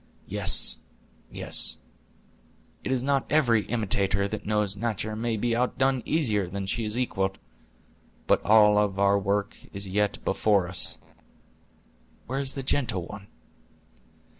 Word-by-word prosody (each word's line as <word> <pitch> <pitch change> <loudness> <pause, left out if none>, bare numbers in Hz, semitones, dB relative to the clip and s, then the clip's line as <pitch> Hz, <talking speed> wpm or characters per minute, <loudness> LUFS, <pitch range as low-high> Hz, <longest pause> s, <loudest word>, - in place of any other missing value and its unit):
Yes, - - +3 0.5
yes; - - -4 1.1
it - - -3
is 130 -2 +1
not 140 0 +1
every 120 -9 +3
imitator 100 -3 +1
that 110 0 -6
knows 105 -2 0
natur' 110 0 -3
may 115 0 -1
be 115 +2 0
outdone 130 +1 +1
easier 110 - +1
than 100 +1 -4
she 110 +4 -1
is 105 +2 -2
equaled. 95 -6 -1 0.9
But - - +2
all 105 -1 +6
our 100 -1 +2
work 100 +2 -1 0.2
is 100 0 -3
yet 105 +2 0
before 100 -2 +2
us. 90 - 0 1.3
Where 135 +2 -3
is 135 -1 -3
the 135 - -4
gentle 120 -10 -1
one?" 100 0 -10
105 Hz, 130 wpm, -26 LUFS, 100-120 Hz, 1.3 s, all